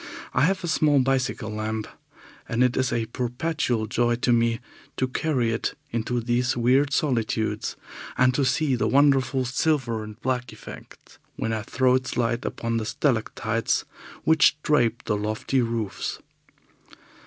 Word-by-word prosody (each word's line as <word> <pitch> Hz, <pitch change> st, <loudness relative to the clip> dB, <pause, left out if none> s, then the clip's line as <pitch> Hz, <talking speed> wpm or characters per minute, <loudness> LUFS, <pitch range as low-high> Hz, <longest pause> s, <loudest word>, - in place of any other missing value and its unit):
I -, -, +2 dB
have 185 Hz, +1 st, 0 dB
a -, -, -2 dB
small 155 Hz, -3 st, +3 dB
bicycle 130 Hz, -4 st, 0 dB
lamp, 110 Hz, 0 st, -3 dB, 0.6 s
and 115 Hz, +2 st, +2 dB
it 125 Hz, -1 st, +2 dB
is 130 Hz, -1 st, +1 dB
a 115 Hz, -1 st, 0 dB
perpetual 125 Hz, 0 st, -1 dB
joy 120 Hz, +2 st, +1 dB
to 120 Hz, 0 st, +1 dB
me 115 Hz, 0 st, +2 dB, 0.4 s
to 130 Hz, -, +1 dB
carry 130 Hz, -3 st, 0 dB
it 115 Hz, -, -2 dB, 0.2 s
into 120 Hz, +1 st, -1 dB
these 120 Hz, +2 st, 0 dB
weird 130 Hz, +4 st, +3 dB
solitudes, 110 Hz, -6 st, 0 dB, 0.4 s
and 125 Hz, 0 st, +4 dB
to 140 Hz, -, +1 dB
see 140 Hz, +1 st, +1 dB
the 120 Hz, -, +1 dB
wonderful 135 Hz, -2 st, +3 dB
silver 125 Hz, -4 st, 0 dB
and 105 Hz, +1 st, -10 dB
black 125 Hz, -1 st, -2 dB
effect -, -, -13 dB, 0.2 s
when 115 Hz, -, -2 dB
I 110 Hz, -, -1 dB
throw 130 Hz, +4 st, +2 dB
its 130 Hz, 0 st, -1 dB
light 120 Hz, 0 st, 0 dB
upon 115 Hz, 0 st, -2 dB
the 110 Hz, -, -2 dB
stalactites 115 Hz, -4 st, 0 dB, 0.4 s
which 155 Hz, -2 st, +4 dB
drape 120 Hz, -5 st, +2 dB
the 105 Hz, -, 0 dB
lofty 110 Hz, +5 st, -1 dB
roofs. 115 Hz, -4 st, -3 dB
120 Hz, 150 wpm, -25 LUFS, 115-130 Hz, 0.6 s, and